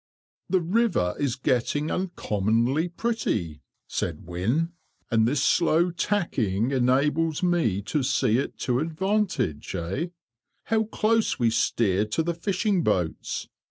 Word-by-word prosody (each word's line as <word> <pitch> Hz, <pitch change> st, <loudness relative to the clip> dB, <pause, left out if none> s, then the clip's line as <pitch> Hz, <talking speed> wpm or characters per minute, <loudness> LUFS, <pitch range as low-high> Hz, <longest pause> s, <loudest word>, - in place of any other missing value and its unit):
"The 185 Hz, -1 st, +3 dB
river 180 Hz, -, +1 dB
is 140 Hz, -4 st, 0 dB
getting 130 Hz, +4 st, 0 dB
uncommonly 125 Hz, -, 0 dB
pretty," 170 Hz, -, -2 dB, 0.2 s
said 85 Hz, -3 st, -3 dB
Wynne, 115 Hz, -, -1 dB, 0.4 s
"and 110 Hz, -1 st, +3 dB
this 135 Hz, +1 st, +1 dB
slow 170 Hz, +1 st, +3 dB
tacking 135 Hz, -, 0 dB
enables 145 Hz, +6 st, +1 dB
me 140 Hz, -, +1 dB
to 120 Hz, +9 st, -1 dB
see 130 Hz, -3 st, +2 dB
it -, -, -4 dB
to 125 Hz, -1 st, +1 dB
advantage, 165 Hz, -, -1 dB
eh! 95 Hz, -, -2 dB, 0.6 s
How 220 Hz, 0 st, +1 dB
close 220 Hz, +1 st, +1 dB
we 115 Hz, -3 st, +2 dB
steer 105 Hz, -3 st, +1 dB
to 105 Hz, +9 st, -1 dB
the 170 Hz, +1 st, -1 dB
fishing 190 Hz, +2 st, 0 dB
boats! 90 Hz, -, -1 dB
140 Hz, 125 wpm, -26 LUFS, 110-175 Hz, 0.6 s, The